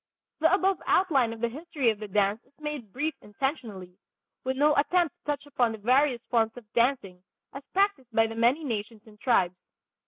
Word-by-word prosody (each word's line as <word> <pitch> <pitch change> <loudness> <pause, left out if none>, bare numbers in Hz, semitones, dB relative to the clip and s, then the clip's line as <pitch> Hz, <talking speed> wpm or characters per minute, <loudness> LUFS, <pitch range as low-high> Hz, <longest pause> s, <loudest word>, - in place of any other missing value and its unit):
The 320 +1 +4
above 385 0 +2
outline 280 -11 +3
of 225 -1 -8
the 235 - +2
history 280 -1 -1
of 210 - -7
the 215 - -6
dance 205 +2 +1
is 285 - -33
made 300 -8 -5
brief 300 +7 -2
intentionally, 210 - -5 0.4
with 260 0 -2
no 295 +1 +4
attempt 340 +3 +2
to - - -55
touch 290 -1 -2
upon 245 -5 0
the - - -6
various 250 +3 +2
forms 225 -1 +1
of 245 - -10
dancing 235 -7 +1 0.3
as 275 - -7
practiced 390 - +1
by 225 0 +4
the 225 - -5
many 240 +7 +2
nations 220 -4 -4
and 210 -1 -17
tribes. 190 -8 +2
245 Hz, 190 wpm, -27 LUFS, 220-295 Hz, 0.4 s, The